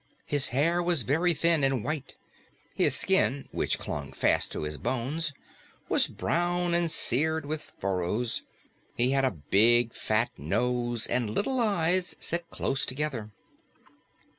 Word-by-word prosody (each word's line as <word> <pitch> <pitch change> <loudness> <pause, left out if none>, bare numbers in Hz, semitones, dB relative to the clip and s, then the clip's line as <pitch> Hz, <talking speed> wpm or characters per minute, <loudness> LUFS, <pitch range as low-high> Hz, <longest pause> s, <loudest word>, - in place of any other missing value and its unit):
His 145 -2 +2
hair 165 +8 +1
was 170 -6 +2
very 160 +9 +2
thin 165 -1 +2
and 135 -4 +1
white; 150 -3 -4 0.6
his - - +2
skin, 190 -8 +1
which - - 0
clung 70 -2 -6
fast - - +1
to - - -4
his 75 -1 -3
bones, 140 - -2 0.6
was - - +4
brown 175 0 -1
and 170 -1 +1
seared 160 +1 +2
with 155 +1 -3 0.2
furrows; 100 +5 -1 0.5
he 125 +2 +2
had 135 -1 +2
a - - +3
big, 110 - +3
fat 115 +3 0
nose 120 -2 -1
and 120 -3 -1
little 255 - -1
eyes 185 -5 +1
set 170 0 -3
close 135 - -2
together. 130 -6 -2
135 Hz, 140 wpm, -28 LUFS, 120-170 Hz, 0.6 s, was